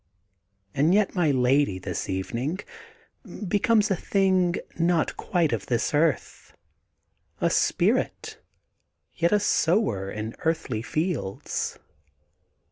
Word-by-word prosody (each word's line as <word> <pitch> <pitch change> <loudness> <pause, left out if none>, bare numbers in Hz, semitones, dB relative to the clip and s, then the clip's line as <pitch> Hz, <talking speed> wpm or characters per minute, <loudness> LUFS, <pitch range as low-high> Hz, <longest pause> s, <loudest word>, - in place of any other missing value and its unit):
And 155 +7 +3
yet 210 -1 +2
my 175 -5 +2
lady, 130 -5 +2
this 95 - -5
evening, 120 - -3 0.9
becomes 210 +1 +2
a - - +3
thing 185 -2 +1 0.2
not 170 -1 +1
quite 165 -7 0
of 110 - -3
this 120 +2 0
earth, 150 0 -1 0.8
a - - +1
spirit, - - 0 0.7
yet 170 +1 +1
a 210 - +4
sower 170 - +1
in 110 +2 -5
earthly 160 -9 -1
fields. 155 - -3
160 Hz, 105 wpm, -25 LUFS, 120-185 Hz, 0.9 s, a